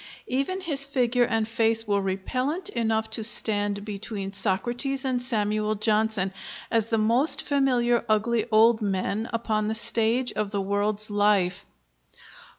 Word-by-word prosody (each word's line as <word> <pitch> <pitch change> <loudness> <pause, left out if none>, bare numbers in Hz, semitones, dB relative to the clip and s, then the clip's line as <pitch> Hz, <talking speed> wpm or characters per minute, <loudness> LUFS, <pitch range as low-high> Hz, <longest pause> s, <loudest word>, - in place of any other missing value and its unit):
Even 275 +9 -2
his 290 -6 +4
figure 250 -3 +1
and 225 -2 -1
face 225 0 +1
were 200 -1 +1
repellent 255 - -3
enough 220 - -1
to 220 0 -2
stand 205 -2 +2
between 200 -1 -6
Socrates 245 +8 -2
and 255 -2 -1
Samuel 215 -3 -1
Johnson, 215 -2 0 0.4
as 225 -2 +1
the 225 - 0
most 235 +8 +3
familiar 250 -4 +1
ugly 220 +1 0
old 220 +1 +4
men 200 +2 -2
upon 220 -2 -2
the 220 - 0
stage 230 +2 +2
of 215 -1 -3
the 200 -1 -3
world's 205 +2 -2
life. 205 -2 +1
220 Hz, 140 wpm, -25 LUFS, 205-240 Hz, 0.4 s, his